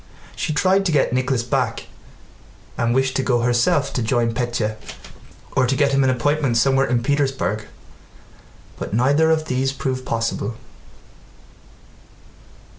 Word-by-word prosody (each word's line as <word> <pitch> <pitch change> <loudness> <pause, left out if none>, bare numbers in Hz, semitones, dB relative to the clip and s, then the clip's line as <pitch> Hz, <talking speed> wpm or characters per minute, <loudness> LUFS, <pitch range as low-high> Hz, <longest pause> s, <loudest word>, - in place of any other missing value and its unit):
She - - -2
tried 185 +6 +2
to - - 0
get 140 -5 +2
Nicholas 130 -1 0
back 120 - -1 0.9
and 115 +1 0
wished 130 0 +1
to - - +1
go 120 -2 +1
herself 120 +4 +1
to 125 - -1
join 115 0 0
Pétya, 120 -3 -2 0.8
or 130 -1 +3
to 135 - +1
get 140 0 +2
him 135 0 +3
an 130 - +3
appointment 135 0 +1
somewhere 135 +3 +3
in 120 -1 0
Petersburg, 135 -6 -1 1.1
but - - -4
neither 145 +7 +3
of 160 -1 +1
these 130 -1 0
proved 130 -1 -3
possible. 115 -2 -2
130 Hz, 135 wpm, -21 LUFS, 120-140 Hz, 1.1 s, or